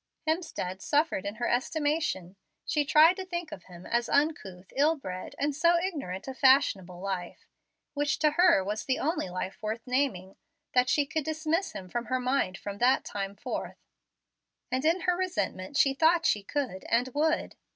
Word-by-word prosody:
Hemstead 315 - -2
suffered 290 - +1
in 205 - -4
her 240 +2 -2
estimation. 275 - -1 0.3
She 300 - +1
tried 315 +5 +6
to 380 - -4
think 345 -3 -4
of 310 - -9
him 180 -1 -13
as 235 0 0
uncouth, 200 - -1
ill 300 +4 +3
bred, 185 -10 -7
and 290 +1 0
so 340 +3 +4
ignorant 290 - -4
of 265 0 -7
fashionable 200 -10 +3
life 185 -2 -5 0.5
which 290 0 0
to 305 -1 +3
her 345 - +5
was 210 +3 -3
the 265 - +1
only 315 - -1
life 185 +5 -5
worth 220 +1 -4
naming 250 -8 -1 0.4
that 250 0 +3
she 290 +3 +3
could 315 +2 -2
dismiss 315 +4 -1
him 185 - -7
from 240 +6 -3
her 255 +4 -1
mind 250 -7 0
from 200 0 -7
that, 250 +2 +3
time 195 -1 -4
forth. 205 - -5 0.9
And 255 +2 0
in 335 +3 +3
her 360 +1 +2
resentment 345 - -2
she 275 -2 +4
thought 330 +4 +3
she 210 - +3
could 245 -3 -3
and 245 +2 +2
would. 305 +4 0
265 Hz, 175 wpm, -29 LUFS, 195-315 Hz, 0.9 s, tried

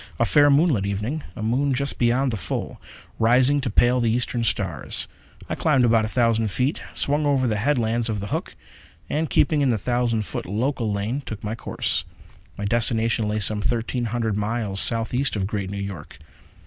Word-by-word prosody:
A - - +2
fair, 145 0 +5
moonlit 140 - +3
evening 105 +10 -2
a 110 - -6
moon 130 +5 +1
just 140 +2 -3
beyond 125 +2 +2
the - - -2
full, 90 - -4 0.4
rising 125 +5 +4
to 130 - -2
pale 120 +4 +3
the 120 -2 +1
eastern 120 +1 -1
stars. 90 - -2 0.4
I - - -3
climbed 135 -6 +2
about 115 -2 +3
a - - -2
thousand 115 -1 +2
feet, 125 +8 -1
swung 145 +1 0
over 135 -2 +2
the 110 -3 0
headlands 120 -2 0
of 105 -2 -2
the 100 +1 -5
Hook, - - -3 0.6
and, 155 +1 0
keeping 150 0 +2
in 140 - +3
the 115 - +2
thousand 120 0 0
foot - - -5
local 115 +3 -1
lane, 105 +7 -2
took 110 -6 -8
my 105 +1 -3
course. 115 - -2 0.5
My 100 - -4
destination 115 0 +1
lay 105 +1 -1
some 105 0 +2
thirteen 120 +2 -1
hundred 115 -2 -1
miles 105 -1 -1
southeast 120 +5 +1
of 100 -2 -1
Great 100 -2 -3
New 100 - -5
York. 100 -6 -7
115 Hz, 185 wpm, -23 LUFS, 105-130 Hz, 0.6 s, fair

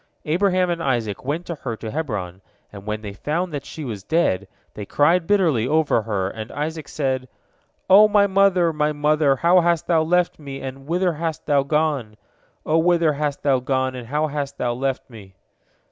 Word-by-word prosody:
Abraham 180 +2 +1
and 170 -1 -3
Isaac 120 -8 -1
went 150 +7 -3
to 170 - -4
her 130 -7 -5
to 110 -1 -6
Hebron, 100 - -4 0.3
and 100 0 -11
when 105 0 -3
they 100 -1 -6
found 160 - -3
that 145 - -5
she 155 - -7
was 110 -6 -5
dead, 100 - 0 0.3
they 105 - -7
cried 165 - +2
bitterly 165 - +2
over 155 -5 +2
her, 100 -4 -2
and 110 +3 -7
Isaac 155 +1 -4
said: 130 -3 -2 0.6
"O 205 +3 +8
my 205 -1 +4
mother, 190 -4 +3
my 150 0 0
mother, 150 -1 +2
how 175 +6 +4
hast 170 -1 +1
thou 165 -2 +3
left 175 +2 +1
me, 140 -2 -7
and 135 +1 -8
whither 175 +1 +1
hast 160 0 -4
thou 145 -2 +3
gone? 140 -6 -1 0.5
O 160 +1 +2
whither 170 -2 +3
hast 145 -1 -3
thou 135 -3 +3
gone, 130 0 -1
and 125 -2 -8
how 150 +4 0
hast 140 -2 -4
thou 120 -1 -1
left 135 +2 -3
me?" 100 -6 -14
150 Hz, 190 wpm, -22 LUFS, 125-165 Hz, 0.6 s, O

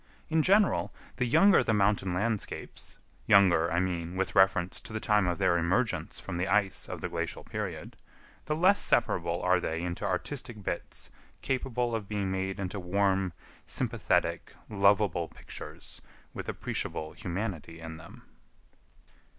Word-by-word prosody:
In 160 0 +4
general, 200 +5 +3 0.3
the 125 - +1
younger 195 +10 +6
the 110 - +1
mountain 100 -2 +2
landscapes,—younger, 95 -3 +1
I 85 - +2
mean, 90 -1 -2
with 95 0 -1
reference 95 -2 +3
to - - -10
the 110 - -2
time 105 -4 +2
of 90 - 0
their 95 -3 +3
emergence 95 +8 0
from 85 - -5
the 90 +2 0
ice 100 -2 +1
of - - -6
the - - -3
glacial - - -3
period,—the 150 - -7
less 185 +5 +4
separable 85 -7 +1
are 90 0 +4
they 85 -1 -3
into 90 +3 -4
artistic 110 +4 -3
bits - - -4 0.3
capable 125 -2 -1
of 110 -3 -3
being 100 -3 -1
made 95 +1 -2
into 95 +1 -3
warm, 95 0 +1 0.3
sympathetic, - - 0 0.2
lovable 100 -4 +3
pictures - - -9 0.3
with - - -6
appreciable 80 0 -3
humanity 90 -3 -5
in 80 0 -7
them. 80 +1 -13
95 Hz, 140 wpm, -29 LUFS, 90-110 Hz, 0.3 s, younger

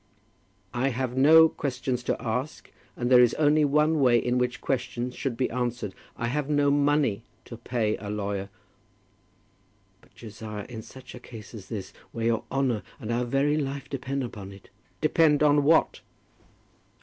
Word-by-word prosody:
"I 125 +2 0
have 130 0 -3
no 160 +5 +7
questions 130 -4 -3
to - - -1
ask, 125 +7 -4 0.3
and 120 +1 -2
there 125 -1 +8
is 120 - +4
only 150 0 +3
one 150 +2 +2
way 125 -3 +5
in 125 +2 0
which 125 -2 -1
questions 125 -1 -2
should 130 -5 -3
be 130 - +1
answered. 120 -4 -3 0.2
I 115 - -2
have 140 +4 -2
no 145 -1 +3
money 145 -6 +2 0.2
to 120 - -9
pay 115 -2 -1
a 100 - -7
lawyer." 100 -1 -3 1.5
"But, - - -26
Josiah, 105 -2 -8
in 115 -3 -7
such 130 +3 -13
a 125 - -9
case 115 -3 -11
as 105 -4 -10
this, 105 -5 -6 0.2
where 115 -1 -3
your 115 -1 0
honour, 130 -6 0 0.2
and 110 - -5
our 120 +1 0
very 140 +4 +1
life 140 -2 -4
depend 135 0 -3
upon 105 -5 -7
it 100 0 -15 0.2
" - - -38
"Depend 155 -1 +3
on 145 -1 +4
what?" 160 +3 +3
125 Hz, 170 wpm, -26 LUFS, 115-140 Hz, 1.5 s, there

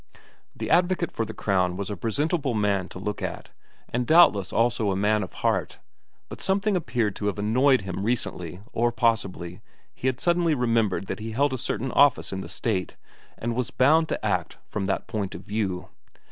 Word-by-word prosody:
The - - -4
advocate 175 0 +2
for 115 - -2
the 110 - -7
Crown 90 -3 +1
was 100 +1 -3
a - - -2
presentable 140 - -1
man 100 -3 +1
to - - -9
look 105 +2 -4
at, - - -5 0.4
and 125 0 -2
doubtless 130 - +5
also 115 -2 +1
a 95 - 0
man 105 +2 +2
of - - -6
heart, - - 0 0.5
but - - -9
something 200 +1 +1
appeared 120 - 0
to 105 - -2
have 105 - -1
annoyed 125 +6 +3
him 95 0 -4
recently 95 -6 -2
or 120 +1 +2
possibly 100 -7 -1 0.3
he 130 - -3
had 130 -1 0
suddenly 170 -2 +2
remembered 115 -6 +1
that - - -5
he 110 +1 -5
held 140 +3 +2
a - - -1
certain 130 +1 -2
office 140 -7 +4
in 95 - -3
the - - -8
State 95 -7 -2 0.4
and 120 +1 -2
was 125 -1 -1
bound 155 +5 +3
to - - -3
act 90 -5 -1
from 100 -2 -3
that 95 - -1
point 105 -3 -3
of - - -8
view. 100 -4 -3
110 Hz, 190 wpm, -25 LUFS, 100-130 Hz, 0.5 s, doubtless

